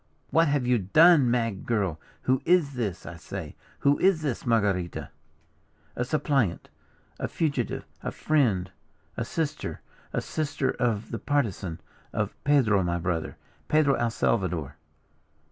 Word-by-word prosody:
"What 165 Hz, +1 st, +4 dB
have 140 Hz, -3 st, +1 dB
you 125 Hz, -1 st, +3 dB
done, 150 Hz, -, +6 dB
mad 115 Hz, -5 st, -1 dB
girl? 100 Hz, -9 st, 0 dB, 0.2 s
Who 130 Hz, 0 st, +2 dB
is 170 Hz, -5 st, +3 dB
this, 110 Hz, -8 st, -3 dB
I -, -, -8 dB
say, -, -, -7 dB, 0.3 s
who 140 Hz, 0 st, +3 dB
is 185 Hz, -4 st, +3 dB
this, 140 Hz, -5 st, -2 dB
Marguerita?" 100 Hz, -6 st, 0 dB, 0.9 s
"A 125 Hz, -, 0 dB
suppliant, 135 Hz, -, 0 dB, 0.5 s
a -, -, -1 dB
fugitive, 140 Hz, -8 st, -1 dB, 0.2 s
a -, -, -3 dB
friend, 110 Hz, -12 st, +1 dB, 0.4 s
a -, -, -2 dB
sister, 150 Hz, +4 st, -3 dB, 0.3 s
a -, -, 0 dB
sister 145 Hz, -3 st, -1 dB
of 115 Hz, -4 st, -1 dB
the 115 Hz, -, -3 dB
Partisan 105 Hz, -, -1 dB, 0.3 s
of -, -, -1 dB
Pedro, 125 Hz, -9 st, +4 dB
my 85 Hz, -1 st, 0 dB
brother, 85 Hz, -2 st, -2 dB, 0.3 s
Pedro 150 Hz, -2 st, +4 dB
el 120 Hz, -3 st, +1 dB
Salvador." 90 Hz, -11 st, -1 dB
120 Hz, 135 wpm, -27 LUFS, 100-145 Hz, 0.9 s, done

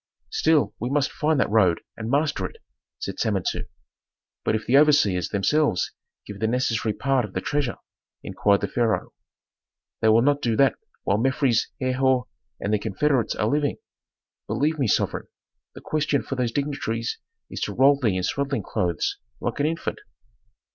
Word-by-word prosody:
"Still 155 Hz, -2 st, +2 dB
we 120 Hz, -, -2 dB
must 145 Hz, 0 st, +1 dB
find 155 Hz, -1 st, +1 dB
that -, -, +2 dB
road 95 Hz, -6 st, +3 dB
and 110 Hz, 0 st, -5 dB
master 140 Hz, -8 st, +1 dB
it," -, -, -16 dB, 0.4 s
said -, -, -5 dB
Samentu. 100 Hz, -4 st, -1 dB, 0.8 s
"But -, -, +1 dB
if 110 Hz, -, -3 dB
the 125 Hz, -, +2 dB
overseers 140 Hz, -, +4 dB
themselves 110 Hz, +2 st, +1 dB, 0.3 s
give 105 Hz, -1 st, -8 dB
the 110 Hz, -, +1 dB
necessary 115 Hz, -2 st, 0 dB
part 135 Hz, +3 st, +1 dB
of 105 Hz, -3 st, -7 dB
the -, -, -1 dB
treasure," 145 Hz, -2 st, -1 dB, 0.5 s
inquired 100 Hz, -1 st, +2 dB
the -, -, 0 dB
pharaoh. 115 Hz, -3 st, 0 dB, 0.9 s
"They 110 Hz, -, +4 dB
will 115 Hz, +2 st, +5 dB
not 145 Hz, +1 st, +2 dB
do 115 Hz, -5 st, +1 dB
that 135 Hz, +3 st, +4 dB, 0.3 s
while 100 Hz, +2 st, +1 dB
Mefres, 130 Hz, -1 st, +2 dB
Herhor, 130 Hz, 0 st, +2 dB, 0.3 s
and 105 Hz, -, -1 dB
their 105 Hz, -, +3 dB
confederates 125 Hz, +4 st, 0 dB
are -, -, 0 dB
living. 145 Hz, +3 st, 0 dB, 0.7 s
Believe 155 Hz, +2 st, 0 dB
me, 130 Hz, -, +2 dB
sovereign, -, -, 0 dB, 0.5 s
the -, -, -10 dB
question 150 Hz, -2 st, 0 dB
for -, -, -5 dB
those 125 Hz, -3 st, 0 dB
dignitaries 120 Hz, -5 st, -2 dB, 0.3 s
is -, -, -6 dB
to -, -, -2 dB
roll 140 Hz, +2 st, +5 dB
thee 110 Hz, -8 st, +1 dB
in 90 Hz, -, -2 dB
swaddling 140 Hz, +2 st, -1 dB
clothes, 85 Hz, -3 st, -1 dB, 0.2 s
like 120 Hz, -, -3 dB
an 145 Hz, -, +2 dB
infant." 165 Hz, +1 st, -3 dB
125 Hz, 165 wpm, -24 LUFS, 110-145 Hz, 0.9 s, will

